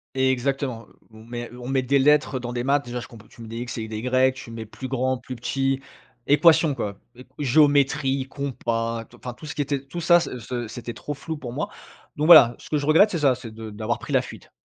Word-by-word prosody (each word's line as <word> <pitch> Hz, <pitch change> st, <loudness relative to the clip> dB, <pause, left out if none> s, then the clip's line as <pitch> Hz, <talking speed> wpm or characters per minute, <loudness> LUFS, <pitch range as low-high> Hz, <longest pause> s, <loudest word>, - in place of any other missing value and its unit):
Exactement, 130 Hz, -2 st, 0 dB, 0.2 s
mais 120 Hz, +2 st, -8 dB
on 125 Hz, 0 st, -8 dB
met 135 Hz, -1 st, +1 dB
des 140 Hz, +3 st, +2 dB
lettres 145 Hz, 0 st, +3 dB
dans 120 Hz, 0 st, -5 dB
des 120 Hz, +1 st, -3 dB
maths, 145 Hz, +1 st, +2 dB
déjà, 120 Hz, 0 st, -4 dB
je -, -, -8 dB
compr 110 Hz, -2 st, -15 dB
tu 115 Hz, -, -15 dB
mets 115 Hz, -, -9 dB
des 115 Hz, +1 st, -6 dB
x 120 Hz, 0 st, -5 dB
et 110 Hz, -1 st, -4 dB
des 110 Hz, -1 st, -5 dB
y, 130 Hz, +2 st, +2 dB
tu 130 Hz, -3 st, -10 dB
mets 115 Hz, -1 st, -6 dB
plus 130 Hz, +4 st, -8 dB
grand, 130 Hz, 0 st, 0 dB
plus 125 Hz, 0 st, -8 dB
petit, 135 Hz, +2 st, -1 dB, 0.5 s
équation, 160 Hz, 0 st, +5 dB
quoi, 100 Hz, -6 st, -4 dB, 0.2 s
eq 125 Hz, -, -14 dB
géométrie, 140 Hz, -1 st, +3 dB
compas, 115 Hz, -5 st, -3 dB
tou 120 Hz, -, -19 dB
enfin 125 Hz, 0 st, -7 dB
tout 120 Hz, -, -13 dB
ce 145 Hz, -, -6 dB
qui -, -, -1 dB
était 140 Hz, -1 st, -1 dB
tout 170 Hz, +5 st, -6 dB
ça, 175 Hz, +1 st, +6 dB
ce 145 Hz, -6 st, -4 dB
ce 120 Hz, 0 st, -5 dB
c'était 120 Hz, +1 st, -7 dB
trop 145 Hz, -, -6 dB
flou 155 Hz, +3 st, -6 dB
pour 125 Hz, -4 st, -7 dB
moi. 145 Hz, -, -3 dB, 0.5 s
Donc 150 Hz, -, 0 dB
voilà, 155 Hz, -8 st, +9 dB
ce -, -, -13 dB
que -, -, 0 dB
je 145 Hz, -, -2 dB
regrette 160 Hz, +8 st, +6 dB
c'est 170 Hz, -, -1 dB
ça, 140 Hz, -4 st, +3 dB
c'est 115 Hz, -3 st, -9 dB
de 110 Hz, 0 st, -7 dB
d'avoir 110 Hz, +2 st, -3 dB
pris -, -, -8 dB
la -, -, +4 dB
fuite. -, -, -12 dB
130 Hz, 240 wpm, -24 LUFS, 120-140 Hz, 0.5 s, voilà